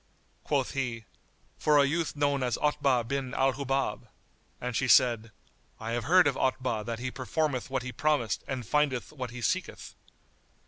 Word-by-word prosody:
Quoth 140 Hz, -4 st, 0 dB
he, 120 Hz, -5 st, -3 dB, 0.5 s
"For 150 Hz, -1 st, +4 dB
a 140 Hz, -, +6 dB
youth 160 Hz, +3 st, -1 dB
known 145 Hz, -1 st, +1 dB
as 125 Hz, -2 st, 0 dB
Otbah 140 Hz, -4 st, +2 dB
bin 135 Hz, 0 st, -3 dB
al 135 Hz, 0 st, +3 dB
Hubab;" 135 Hz, 0 st, -2 dB, 0.5 s
and 125 Hz, -1 st, -4 dB
she 130 Hz, -, +1 dB
said, 115 Hz, -1 st, +4 dB, 0.5 s
"I 115 Hz, 0 st, -4 dB
have 120 Hz, 0 st, -2 dB
heard 180 Hz, +4 st, +6 dB
of 145 Hz, -, +3 dB
Otbah 125 Hz, -4 st, 0 dB
that 115 Hz, -1 st, -3 dB
he 125 Hz, +2 st, -4 dB
performeth 130 Hz, +2 st, -2 dB
what 130 Hz, -1 st, -2 dB
he 125 Hz, -, -5 dB
promiseth 145 Hz, -7 st, 0 dB
and 130 Hz, -3 st, -4 dB
findeth 140 Hz, +1 st, 0 dB
what 130 Hz, -4 st, -5 dB
he 125 Hz, +1 st, -8 dB
seeketh." 185 Hz, +7 st, -2 dB
130 Hz, 170 wpm, -29 LUFS, 120-145 Hz, 0.5 s, a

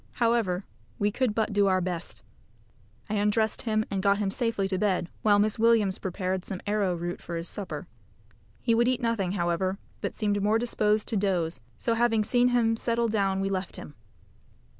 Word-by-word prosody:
However, 230 Hz, -6 st, +1 dB, 0.3 s
we 205 Hz, 0 st, +1 dB
could 235 Hz, -1 st, 0 dB
but 220 Hz, -1 st, 0 dB
do 200 Hz, -1 st, +3 dB
our 185 Hz, -1 st, +3 dB
best. 175 Hz, -2 st, -4 dB, 0.8 s
I 215 Hz, -, -4 dB
undressed 210 Hz, +1 st, +1 dB
him 215 Hz, -1 st, 0 dB
and 195 Hz, -1 st, -1 dB
got 200 Hz, 0 st, +3 dB
him 200 Hz, -2 st, -1 dB
safely 230 Hz, -4 st, 0 dB
to 185 Hz, -1 st, 0 dB
bed, 190 Hz, -4 st, 0 dB
while 205 Hz, -2 st, +4 dB
Miss 210 Hz, +1 st, +2 dB
Williams 220 Hz, -4 st, +3 dB
prepared 185 Hz, 0 st, -2 dB
some 190 Hz, -2 st, -5 dB
arrowroot 180 Hz, -5 st, -1 dB
for 170 Hz, -, -5 dB
his 165 Hz, +1 st, -4 dB
supper. 200 Hz, -3 st, -5 dB, 0.7 s
He 230 Hz, -, +1 dB
would 235 Hz, +1 st, +3 dB
eat 255 Hz, -1 st, +2 dB
nothing, 210 Hz, -6 st, 0 dB
however, 185 Hz, +1 st, 0 dB, 0.2 s
but -, -, -3 dB
seemed 205 Hz, -2 st, 0 dB
more 210 Hz, +2 st, +3 dB
disposed 215 Hz, -2 st, +1 dB
to 225 Hz, -, 0 dB
dose, 175 Hz, -7 st, 0 dB, 0.2 s
so 230 Hz, -, 0 dB
having 225 Hz, -2 st, +2 dB
seen 245 Hz, +3 st, +3 dB
him 235 Hz, -2 st, +2 dB
settle 235 Hz, 0 st, 0 dB
down 195 Hz, -3 st, +1 dB
we 195 Hz, -, 0 dB
left 190 Hz, -1 st, -3 dB
him. 145 Hz, -, -9 dB
205 Hz, 180 wpm, -27 LUFS, 190-225 Hz, 0.8 s, while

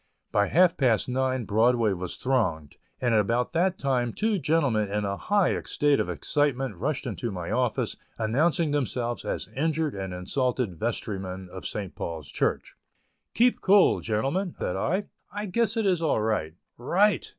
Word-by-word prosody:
By 100 Hz, 0 st, +2 dB
half 175 Hz, +2 st, +4 dB
past 120 Hz, -6 st, +2 dB
nine 130 Hz, -1 st, 0 dB
Broadway 110 Hz, 0 st, +3 dB
was 90 Hz, -1 st, -5 dB
thronged, 95 Hz, -, -1 dB, 0.2 s
and 120 Hz, -2 st, +1 dB
about 115 Hz, -, +1 dB
that 180 Hz, +2 st, +1 dB
time 125 Hz, -4 st, 0 dB
two 215 Hz, -2 st, 0 dB
gentlemen 135 Hz, -, +1 dB
in 105 Hz, +1 st, -1 dB
a 100 Hz, 0 st, -1 dB
high 205 Hz, -, +1 dB
state 145 Hz, -1 st, +2 dB
of -, -, -1 dB
excitement 135 Hz, -6 st, 0 dB
rushed 140 Hz, -, -2 dB
into 115 Hz, -1 st, -3 dB
my 90 Hz, -4 st, -5 dB
office, -, -, 0 dB, 0.2 s
announcing 150 Hz, +8 st, +1 dB
themselves 120 Hz, -3 st, -1 dB
as -, -, -3 dB
injured 155 Hz, +1 st, -1 dB
and 95 Hz, -1 st, -5 dB
insulted 110 Hz, -, -2 dB
vestrymen 95 Hz, -5 st, -3 dB
of 95 Hz, -, -6 dB
St. 100 Hz, -4 st, -5 dB
Paul's 80 Hz, -4 st, -6 dB
Church. -, -, -1 dB, 0.6 s
"Keep 245 Hz, +1 st, +3 dB
cool, 200 Hz, 0 st, +5 dB
gentlemen," 135 Hz, -, -1 dB
said -, -, -2 dB
I; 180 Hz, -, 0 dB, 0.3 s
"I 205 Hz, +1 st, -4 dB
guess 225 Hz, +3 st, 0 dB
it 225 Hz, -, +1 dB
is 180 Hz, -4 st, +2 dB
all 155 Hz, -8 st, +2 dB
right." 105 Hz, -8 st, -1 dB, 0.2 s
"Right!" 190 Hz, +10 st, +2 dB
125 Hz, 160 wpm, -26 LUFS, 105-160 Hz, 0.6 s, cool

